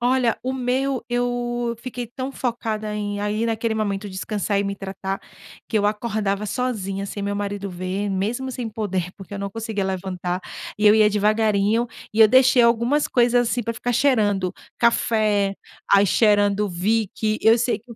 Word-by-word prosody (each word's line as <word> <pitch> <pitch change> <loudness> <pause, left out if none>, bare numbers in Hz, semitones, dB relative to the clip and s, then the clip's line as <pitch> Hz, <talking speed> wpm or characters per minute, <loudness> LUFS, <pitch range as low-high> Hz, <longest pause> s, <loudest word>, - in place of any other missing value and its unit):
Olha, 245 -1 +2
o 260 - -1
meu, 260 +1 -1
eu 240 -1 -1
fiquei 250 -1 -5
tão 255 +3 -5
focada 225 -5 -3
em, 205 -1 -3
aí, 210 +2 -1
naquele 225 0 -1
momento, 205 -1 -2
descansar 200 +1 -2
e - - +2
me 200 0 -3
tratar, 195 0 -5 0.5
que 225 - 0
eu 205 - +2
acordava 210 -1 -1
sozinha, 200 -4 -2
sem 200 +1 -6
meu 200 0 -2
marido 200 0 -3
ver, 185 +3 -3
mesmo 215 +7 -2
sem 240 -2 -4
poder, 195 -5 -3
porque 195 +1 -10
eu - - -5
não 200 0 -3
conseguia 220 -1 -3
levantar, 185 -1 -3 0.4
e 210 - +3
eu 210 - +8
ia 215 -1 +5
devagarinho, 215 +2 +2 0.3
e 220 - +2
eu 220 - +9
deixei 255 +1 +5
algumas 235 +5 +2
coisas, 245 -1 +3
assim, 245 - 0
para 230 +1 -3
ficar 245 +2 -2
cheirando, 210 -8 +2 0.3
café, 215 -4 +2 0.3
aí 200 0 +6
cheirando 205 -1 +3
Vick, 215 +3 0
eu 225 +2 +6
sei 240 +1 0
que 240 +3 -21
eu - - -8
215 Hz, 175 wpm, -22 LUFS, 200-240 Hz, 0.5 s, eu